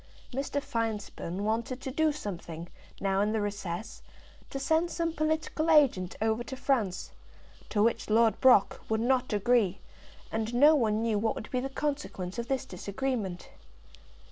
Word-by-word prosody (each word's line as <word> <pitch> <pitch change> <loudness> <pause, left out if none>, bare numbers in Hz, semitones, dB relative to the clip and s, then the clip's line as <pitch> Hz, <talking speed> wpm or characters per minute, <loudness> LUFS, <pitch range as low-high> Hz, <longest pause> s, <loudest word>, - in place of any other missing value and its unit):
Mr. 275 +2 -1
Finespun 220 -8 -3
wanted 230 +4 -1
to 265 0 -5
do 315 +3 +2
something, 175 - -6 0.3
now 195 0 +1
in 210 +1 +1
the 220 - +1
recess, 205 0 -4 0.5
to - - -4
send 320 +5 +1
some 335 -1 -1
political 315 0 0
agent 265 - +4
over 220 +1 +1
to 265 - -6
France, 240 -9 -1 0.6
to 210 -2 +2
which 230 0 +1
Lord 225 -1 +3
Brock 250 -6 +5
would 220 0 +1
not 250 +2 +1
agree; 205 -2 +2 0.5
and 225 +2 -2
no 295 +5 +7
one 225 -6 +2
knew 220 -3 +1
what 225 +1 0
would 215 - -7
be 255 - +1
the 270 +2 -3
consequence 270 -10 -3
of 235 - -3
this 265 0 -1
disagreement. 200 -2 -3
230 Hz, 155 wpm, -29 LUFS, 205-270 Hz, 0.6 s, no